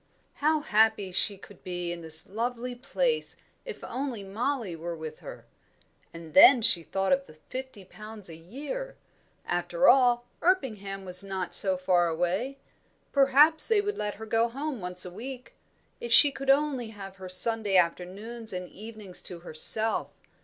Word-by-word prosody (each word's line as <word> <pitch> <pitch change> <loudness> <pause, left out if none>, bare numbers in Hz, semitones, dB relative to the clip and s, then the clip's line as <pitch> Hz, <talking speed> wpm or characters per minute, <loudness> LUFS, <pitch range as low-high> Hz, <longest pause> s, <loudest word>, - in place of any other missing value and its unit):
How 310 +1 0
happy 220 -6 +1
she 200 +2 +5
could 200 0 -17
be 175 -1 -5
in 175 0 -7
this 160 -1 +4
lovely 240 +4 -4
place 455 - -2 0.3
if 470 -3 -9
only 250 -4 -5
Mollie 220 0 -3
were 170 +1 -6
with 155 -1 -9
her! - - -11 0.7
And 165 -2 -12
then 255 -5 +7
she 175 - +6
thought 195 +6 -1
of 275 0 -1
the - - -16
fifty 260 -7 -8
pounds 215 +1 -11
a 165 - -10
year. 290 - -8 0.5
After - - 0
all, 245 -2 +4 0.2
Erpingham 210 - -1
was 180 +1 -1
not 190 -2 -5
so 190 -2 +3
far 180 -1 +1
away. 180 +11 -2 0.5
Perhaps 285 +3 +4
they 445 -3 +2
would 415 0 -3
let 210 -1 -3
her 220 - -9
go 225 +2 0
home 275 -1 -5
once 180 0 0
a 180 - -8
week. 250 +5 -9 0.5
If 235 - -7
she 280 +5 +7
could 275 0 -7
only 275 -3 +1
have 195 -3 -11
her 185 -1 -10
Sunday 210 +1 +4
afternoons 195 +6 -2
and 180 0 -5
evenings 215 -3 -9
to 175 -2 -10
herself! 215 +7 +3
220 Hz, 160 wpm, -27 LUFS, 185-265 Hz, 0.7 s, then